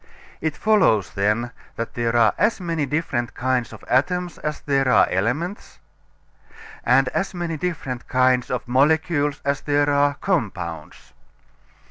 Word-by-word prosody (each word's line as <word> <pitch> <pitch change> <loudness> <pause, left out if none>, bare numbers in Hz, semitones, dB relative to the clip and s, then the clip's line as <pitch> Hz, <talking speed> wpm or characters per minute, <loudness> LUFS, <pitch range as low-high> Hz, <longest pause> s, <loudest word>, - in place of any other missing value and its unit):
It 160 -1 -2
follows, 185 - +3
then, 105 +4 0 0.2
that 115 - -5
there 120 -1 -1
are 115 -3 +4
as 210 +3 +2
many 165 -5 -2
different 135 -5 -2
kinds 125 -2 -1
of - - -12
atoms 175 +7 0
as 150 0 -3
there 135 -2 +1
are - - +5
elements, 135 - -2 1.1
and 130 +2 +4
as 195 +6 -2
many 170 -2 -3
different 145 -7 -4
kinds 130 -1 +2
of 125 -2 -3
molecules 145 +2 +2
as 140 0 0
there 145 0 +1
are 145 0 +2
compounds. 90 - -3
140 Hz, 135 wpm, -22 LUFS, 120-160 Hz, 1.1 s, are